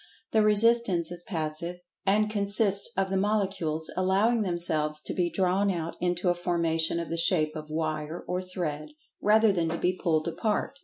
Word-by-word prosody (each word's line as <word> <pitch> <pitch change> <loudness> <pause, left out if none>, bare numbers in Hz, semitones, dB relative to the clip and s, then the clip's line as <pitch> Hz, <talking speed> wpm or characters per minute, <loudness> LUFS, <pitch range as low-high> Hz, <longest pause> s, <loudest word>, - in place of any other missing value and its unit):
The 220 - +3
resistance 210 -5 +3
is 175 -1 -3
"passive," 170 -2 -3 0.3
and 210 +2 +3
consists 200 -1 +1
of 195 0 0
the 195 - +1
Molecules 190 -6 -1
allowing 195 +5 +2
themselves 160 -5 0
to - - -3
be 175 -2 0
drawn 190 +2 +1
out 170 -3 -3
into 180 0 0
a - - +4
formation 170 -2 0
of 170 - -5
the 165 - -3
shape 165 -2 +2
of 155 0 -7
wire 155 +1 -3
or 180 0 -2
thread, 180 - -5 0.3
rather 215 +1 +4
than 170 -4 0
to 165 - -2
be 180 +2 +1
pulled 160 -3 0
apart. 215 +9 -2
180 Hz, 170 wpm, -27 LUFS, 165-200 Hz, 0.3 s, a